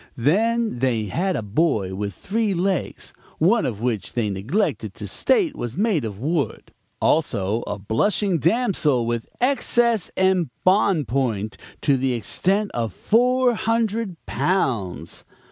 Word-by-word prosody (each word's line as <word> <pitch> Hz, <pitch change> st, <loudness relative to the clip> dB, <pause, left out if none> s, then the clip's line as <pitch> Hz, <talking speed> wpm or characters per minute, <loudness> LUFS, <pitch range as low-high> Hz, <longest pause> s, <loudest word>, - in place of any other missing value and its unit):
Then 220 Hz, -, +1 dB
they 120 Hz, -4 st, +1 dB
had 180 Hz, -, -1 dB
a 115 Hz, -, -2 dB
boy 105 Hz, -, 0 dB
with 100 Hz, +1 st, -3 dB
three 210 Hz, -, -1 dB
legs, 185 Hz, +1 st, -2 dB, 0.2 s
one 200 Hz, +8 st, +3 dB
of 110 Hz, -4 st, -5 dB
which 115 Hz, -4 st, -2 dB
they 110 Hz, -4 st, 0 dB
neglected 115 Hz, -, -1 dB
to -, -, -7 dB
state 390 Hz, -, +1 dB
was 120 Hz, +4 st, -5 dB
made 200 Hz, -, +1 dB
of 105 Hz, -3 st, -5 dB
wood; 145 Hz, +1 st, -2 dB, 0.3 s
also 110 Hz, -8 st, +1 dB
a 105 Hz, -, -3 dB
blushing 170 Hz, -, +1 dB
damsel 165 Hz, -, +2 dB
with 120 Hz, -1 st, -3 dB
excess 240 Hz, -5 st, +2 dB
embonpoint 155 Hz, -, +1 dB, 0.3 s
to 140 Hz, -3 st, +3 dB
the 130 Hz, 0 st, 0 dB
extent 195 Hz, -, 0 dB
of 115 Hz, -2 st, -2 dB
four 250 Hz, +2 st, +3 dB
hundred 225 Hz, -4 st, -1 dB
pounds. 120 Hz, -, -1 dB
160 Hz, 130 wpm, -22 LUFS, -, 0.3 s, one